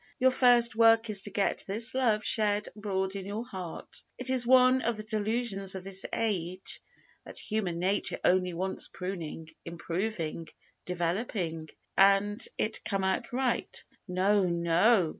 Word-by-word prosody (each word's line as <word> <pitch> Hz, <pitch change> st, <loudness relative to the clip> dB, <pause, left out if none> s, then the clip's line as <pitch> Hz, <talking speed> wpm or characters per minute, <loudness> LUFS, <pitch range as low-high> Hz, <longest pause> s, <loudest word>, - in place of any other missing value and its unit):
Your 260 Hz, 0 st, +4 dB
first 245 Hz, -2 st, +4 dB
work 225 Hz, 0 st, +5 dB
is 200 Hz, -2 st, +3 dB
to 205 Hz, -, -5 dB
get 200 Hz, -1 st, 0 dB
this 225 Hz, +5 st, +1 dB
love 230 Hz, -5 st, +1 dB
shed 210 Hz, -1 st, +2 dB
abroad 190 Hz, -2 st, -2 dB
in 195 Hz, -, -4 dB
your 215 Hz, +4 st, -4 dB
heart. 185 Hz, -8 st, -8 dB, 0.2 s
It 255 Hz, +1 st, 0 dB
is 250 Hz, -2 st, +1 dB
one 255 Hz, 0 st, +6 dB
of 235 Hz, -2 st, -1 dB
the 215 Hz, -, -5 dB
delusions 215 Hz, -2 st, -1 dB
of 190 Hz, -, -6 dB
this 195 Hz, 0 st, -1 dB
age 185 Hz, -5 st, -3 dB, 0.4 s
that -, -, -11 dB
human 205 Hz, -6 st, -2 dB
nature 190 Hz, +4 st, 0 dB
only 180 Hz, -1 st, +2 dB
wants 190 Hz, +2 st, -2 dB
pruning, 170 Hz, -4 st, -6 dB
improving, 170 Hz, -1 st, -4 dB, 0.4 s
developing, 175 Hz, -2 st, -2 dB, 0.3 s
and 200 Hz, +2 st, +4 dB
it 220 Hz, +1 st, -2 dB
come 195 Hz, -2 st, -1 dB
out 190 Hz, +5 st, -1 dB
right. 250 Hz, -1 st, -1 dB, 0.2 s
No, 195 Hz, +3 st, +2 dB
no! 170 Hz, +3 st, +3 dB
200 Hz, 145 wpm, -29 LUFS, 180-225 Hz, 0.4 s, one